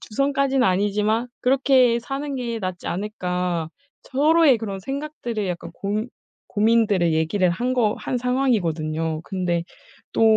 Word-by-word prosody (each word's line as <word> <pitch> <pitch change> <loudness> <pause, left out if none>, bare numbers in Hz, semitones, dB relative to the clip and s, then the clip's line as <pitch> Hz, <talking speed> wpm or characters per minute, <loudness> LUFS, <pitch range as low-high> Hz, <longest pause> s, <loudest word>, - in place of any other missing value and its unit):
'주선까지는 275 +2 +1
아니지만 210 +5 +1
그렇게 255 -2 +4
사는 275 +3 -4
게 235 -3 -3
낫지 185 -3 -5
않을까?' 180 -4 -2 0.3
서로의 295 -1 +4
그런 200 -3 -5
생각들의 270 -5 -4
약간 175 -1 -5
고 210 +3 -2 0.4
고민들의 210 -5 +3
얘기를 175 +4 +2
한 240 +9 -1
거 220 -4 +2
한 250 - -2
상황이거든요. 165 - 0
근데 175 -3 -1 0.5
또 - - +1
215 Hz, 295 characters per minute, -23 LUFS, 180-255 Hz, 0.5 s, 그렇게